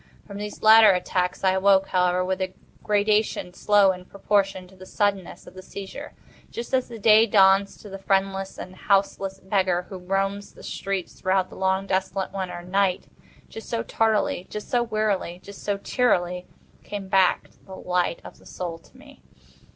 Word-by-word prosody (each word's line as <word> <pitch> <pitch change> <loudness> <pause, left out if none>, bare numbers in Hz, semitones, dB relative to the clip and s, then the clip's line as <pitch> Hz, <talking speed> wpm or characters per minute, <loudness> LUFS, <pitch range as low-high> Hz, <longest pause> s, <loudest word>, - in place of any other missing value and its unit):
From 200 -1 -9
these 210 0 -7
latter 220 0 +8
attacks 180 0 -2
I 190 - +4
awoke, 190 0 +3
however, 180 0 +1
with 190 0 -2
a 185 0 -3 0.3
gradation 210 -3 0
slow 205 0 +4
in 180 -1 -8
proportion 195 -1 -1
to 190 - -19
the 185 0 -13
suddenness 200 -3 -2
of - - -13
the 185 - -10
seizure. 200 +10 -9 0.4
Just 235 +2 -7
as 255 -1 +1
the 235 - -9
day 220 +1 +5
dawns 195 -1 +4
to - - -13
the 195 -1 -8
friendless 195 0 -1
and 185 - -9
houseless 195 -1 0
beggar 185 -2 0
who 190 - -7
roams 195 +2 -2
the - - -14
streets 195 -2 -4
throughout 185 0 0
the - - -11
long 190 0 0
desolate 190 0 -2
winter 185 -3 -5
night—just 195 +3 -4
so 230 -1 -2
tardily—just 210 -2 -1
so 245 - +1
wearily—just 200 -4 -3
so 205 -1 -1
cheerily 180 -6 0 0.4
came 200 -2 -6
back 190 -1 +2 0.2
the 190 - -9
light 180 -2 -1
of - - -12
the - - -21
Soul 170 -2 -6
to - - -22
me. - - -17
195 Hz, 165 wpm, -24 LUFS, 185-205 Hz, 0.4 s, latter